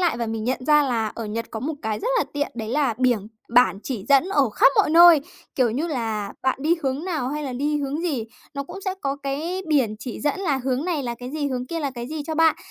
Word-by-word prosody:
lại 350 -3 +2
và 235 - -2
mình 220 -1 -3
nhận 255 +1 -2
ra 300 -1 +6
là 235 -5 0
ở 230 - -5
Nhật 225 +2 -4
có 220 - -5
một 305 +4 -2
cái 220 -1 -2
rất 475 - -2
là - - +2
tiện, 290 0 -1
đấy 220 -2 -5
là 270 -2 +1
biểng 245 -6 +2 0.2
bản 240 -4 +4
chỉ 230 -7 -4
dẫn 280 +6 +5
ở 285 - +2
khắp 275 - +5
mọi - - +4
nơi, 340 -1 +8 0.3
kiểu 250 -3 +2
như 285 +9 -1
là, 225 -8 -3
bạn 260 0 +1
đi 325 +3 +3
hướng 275 +4 -1
nào 310 -9 -2
hay 300 +2 -3
là 270 - -4
đi 290 +4 0
hướng 285 +2 -2
gì, 280 -11 -1 0.3
nó 280 - -2
cũng 390 - -9
sẽ 380 - -1
có 275 0 -2
cái 320 +7 -3
biển 260 -8 +2
chỉ 230 +1 -6
dẫn 295 +6 -1
là 300 -8 +1
hướng 265 +3 0
này 335 -6 -1
là 240 -2 -3
cái 250 +2 -8
gì, 295 -1 -2
hướng 250 -1 -3
kia 335 +3 -3
là 280 -2 -1
cái 240 -1 -6
gì 305 0 -4
cho 315 - -3
bạn. 325 0 +4
275 Hz, 270 wpm, -23 LUFS, 240-305 Hz, 0.3 s, nơi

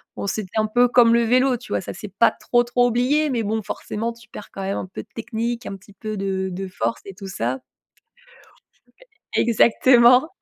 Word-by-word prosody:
Bon, 200 - -4
c'était 215 +1 -3
un 215 - +1
peu 245 +3 +3
comme 235 -1 +5
le 235 - +3
vélo, 250 +2 +3
tu 245 - -14
vois? - - 0
Ça, - - -7
c'est 210 +3 -8
pas 230 - +4
trop, 240 0 +1
trop 245 0 +2
oublié. 270 +5 +1
Mais 235 -2 0
bon, 220 0 -2
forcément, 225 +3 -4
tu 235 +1 -18
perds 210 - -10
quand 195 - -7
même 195 +1 -2
un - - -4
peu 185 - -8
de - - -18
technique, 235 +1 -3
un 195 - -5
petit 195 +1 -17
peu 215 +1 -6
de 190 -1 -2
de 190 +2 -5
force 115 -10 -3
et 195 -2 -9
tout 195 0 -9
ça. 130 -7 -3 1.7
Exactement. 240 +3 +5
225 Hz, 205 wpm, -22 LUFS, 195-240 Hz, 1.7 s, comme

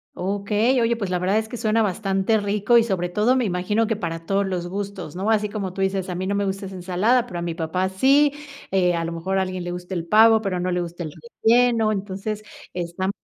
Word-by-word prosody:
okey, 205 +6 +1
oye, 235 0 +2
pues 200 -5 -4
la 180 - 0
verdad 190 +4 +1
es 220 0 -5
que 245 - -6
suena 225 0 +1
bastante 195 +1 +1
rico 205 +3 +2
y, 230 - +5
sobre 185 -5 -1
todo, 215 +7 +2
me 250 -3 +1
imagino 205 +4 0
que 225 - 0
para 165 -4 -5
todos 200 0 +1
los 180 -2 -3
gustos, 195 -4 -5
¿no? 200 +5 0
Así 210 -1 +1
como 195 -4 -4
tú 195 - -4
dices, 190 -1 0
a 180 - -4
mí 185 +2 -3
no 200 - 0
me 200 0 0
gusta 195 0 -3
esa 190 - -9
ensalada, 190 +7 +1
pero 180 -7 -6
a - - -4
mi 170 -1 -3
papá 180 +3 -1
sí, 275 +9 +4 0.4
eh, 180 -2 +2
a 165 -1 -1
lo 165 - -4
mejor 185 +3 -1
a - - +2
alguien 185 -1 -3
le 175 - -4
gusta 180 +1 -6
el 170 -1 -3
pavo, 220 +3 +6
pero 185 -3 -1
no 180 +1 -1
le 180 0 0
gusta 175 0 -6
el 155 -3 -5 0.3
relleno, 230 -1 +4
entonces, 205 +1 -4 0.3
están 180 +2 -2
195 Hz, 250 wpm, -23 LUFS, 180-215 Hz, 0.4 s, pavo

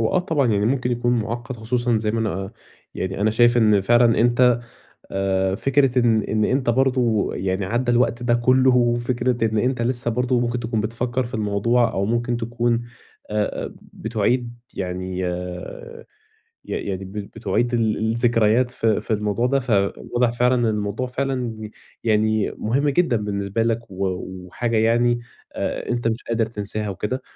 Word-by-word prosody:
هو 110 - +2
آه 185 - +4
طبعًا، 160 -7 +1
يعني 105 +1 +1
مُمكن 125 -1 0
يكون 120 0 0
مُعقد، 115 +3 -4
خصوصًا 120 +1 0
زي 105 0 -1
ما 115 - -1
أنا 110 -3 0
آآ 95 +1 -5 0.4
يعني 95 +1 -3
أنا 110 +1 +3
شايف 120 +2 +4
إن 105 -3 +4
فعلًا 120 +3 +4
أنت 120 0 +4 0.5
آآ 95 -1 0
فكرة 135 +2 +2
إن 115 -3 +3
إن 110 +1 0
أنت 130 0 +1
برضه 125 -4 +2
يعني 95 +1 -1
عَدَّى 120 +5 0
الوقت 120 0 +1
ده 120 -1 +2
كُله، 130 +1 +4
وفكرة 120 0 +1
إن 110 - 0
أنت 125 +1 0
لسه 120 0 0
برضه 125 +1 +1
مُمكن 120 0 -1
تكون 115 -1 -1
بتفكر 120 +3 -2
في 125 +2 -7
الموضوع، 110 +3 +1
أو 95 - 0
مُمكن 120 +2 0
تكون 120 0 -1 0.5
أ 105 0 -1
أ - - -8
بتُعِيد 120 +2 -2 0.2
يعني 90 0 -4
ي 90 - -6 0.7
يعني 95 -1 -3
ب 95 - -10
بتُعِيد 105 +3 -2
ال 110 -2 +1 0.2
الذكريات 115 +1 +3
في 115 -3 +1
في - - -4
الموضوع 105 +3 0
ده. 135 +1 +2
فواضح 120 +2 0
فعلًا 125 +1 +2
إن 120 -2 +1
الموضوع 105 +3 -1
فعلًا 125 -4 -3 0.3
يعني 110 -1 +2
مُهم 135 +7 +1
جدًا 140 -4 +2
بالنسبة 100 +1 -2
لك، 115 -1 -1
و 95 +1 -2 0.4
وحاجة 115 +5 -2
يعني 120 +2 +3 0.3
آآ - - -3
أنت 120 -1 0
مش 115 +1 -2
قادر 115 -1 +1
تنساها 105 -1 -4
وكده. 105 +6 -3
115 Hz, 165 wpm, -22 LUFS, 105-120 Hz, 0.7 s, آه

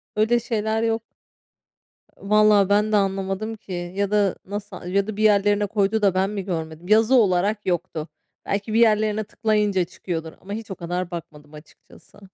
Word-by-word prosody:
öyle 225 +3 +3
şeyler 220 -1 -1
yok. 225 -1 0 1.2
Vallahi 210 -1 +4
ben 210 +1 +2
de 215 - +3
anlamadım 195 +2 -1
ki 175 -4 -6
ya 200 0 -1
da 205 -3 +2
nasıl 205 -2 -7
ya 195 +3 0
da 215 -1 -5
bir 215 - 0
yerlerine 205 0 +3
koydu 210 +1 0
da 195 -3 +3
ben 190 +1 +1
mi 200 -3 -4
görmedim? 160 -1 -5
Yazı 220 +4 +4
olarak 205 -1 +2
yoktu. 175 -3 -2 0.4
Belki 205 +2 -2
bir 225 - +3
yerlerine 215 -1 +3
tıklayınca 210 -3 0
çıkıyordur 165 -2 -6
ama 200 +3 -7
hiç 220 -2 -6
o - - -4
kadar 175 +1 -4
bakmadım 150 -3 -9
açıkçası. 150 +5 -17
200 Hz, 165 wpm, -23 LUFS, 185-215 Hz, 1.2 s, Vallahi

